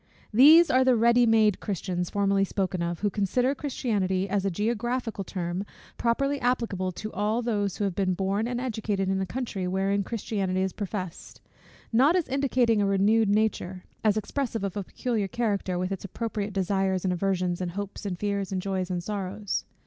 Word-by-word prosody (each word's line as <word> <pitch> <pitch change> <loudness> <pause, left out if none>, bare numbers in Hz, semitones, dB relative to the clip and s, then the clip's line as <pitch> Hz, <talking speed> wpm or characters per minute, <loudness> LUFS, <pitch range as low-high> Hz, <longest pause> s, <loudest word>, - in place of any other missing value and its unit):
These 310 +9 +8
are 255 +1 +5
the 255 -1 +4
ready 235 +1 +4
made 220 -3 +4
Christians 180 -3 -3
formerly 200 -1 +2
spoken 190 -2 -1
of, 170 0 -3
who 205 -1 +1
consider 245 +7 +1
Christianity 205 -10 -1
as 195 0 0
a 200 - +1
geographical 225 +3 -2
term, 180 0 -3 0.3
properly 275 +4 0
applicable 230 -7 0
to 215 +4 -6
all 210 +4 0
those 205 -5 -1
who - - -2
have 195 -2 0
been 185 -1 0
born 195 +4 0
and 245 0 -2
educated 215 -6 -2
in 190 0 0
a 190 - -2
country 215 -4 -3
wherein 195 +2 +1
Christianity 195 -3 -2
is 190 - -2
professed; 190 -4 -6 0.5
not 275 +9 +5
as 360 -4 +1
indicating 255 -5 +2
a - - +2
renewed 205 +2 +3
nature, 200 -3 0 0.2
as 215 -1 +3
expressive 225 0 -2
of 195 -2 -3
a 205 - -2
peculiar 220 0 -2
character, 200 -5 -1
with 185 +1 -2
its 195 - -4
appropriate 210 0 -3
desires 190 -1 0
and 185 -1 +1
aversions, 180 -1 -1
and 175 -2 -3
hopes, 200 +1 -5
and 190 -4 -3
fears, 200 0 -2
and 190 - -1
joys, 190 -1 -2
and 175 -1 -2
sorrows. 205 0 -3
200 Hz, 180 wpm, -27 LUFS, 190-230 Hz, 0.5 s, These